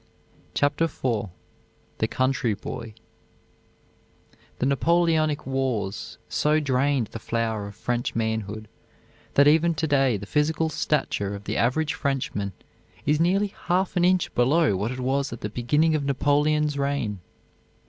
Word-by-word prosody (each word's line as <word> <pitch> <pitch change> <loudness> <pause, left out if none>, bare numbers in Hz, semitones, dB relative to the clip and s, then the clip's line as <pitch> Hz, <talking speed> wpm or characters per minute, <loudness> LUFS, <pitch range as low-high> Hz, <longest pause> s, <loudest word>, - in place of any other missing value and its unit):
CHAPTER 145 +3 +2
IV 125 -9 -2 0.7
THE - - +2
COUNTRY 130 -4 +1
BOY 110 +2 -7 1.6
The - - -1
Napoleonic 155 +1 +2
wars 125 -7 -2
so 150 +1 +2
drained 135 -4 +1
the 115 - -6
flower 110 -2 -2
of 100 - -10
French 120 +1 -2
manhood 110 -1 -2 0.7
that 140 +1 +6
even 160 +2 +4
to 160 +1 -1
day 135 -6 +2
the 100 - -8
physical 155 +5 +1
stature 105 -10 -1
of 100 - -9
the 105 +2 -3
average 145 +6 +1
Frenchman 125 -8 -2 0.5
is 150 +1 +2
nearly 195 +4 +2
half 185 +2 +1
an 175 - +2
inch 180 0 +2
below 140 - +3
what 100 +4 -1
it 130 +1 -5
was 135 +2 0
at 120 - -7
the 105 - -3
beginning 145 +8 +2
of 155 -2 0
Napoleon's 145 +2 +1
reign. 140 -8 -1
140 Hz, 140 wpm, -25 LUFS, 115-155 Hz, 1.6 s, that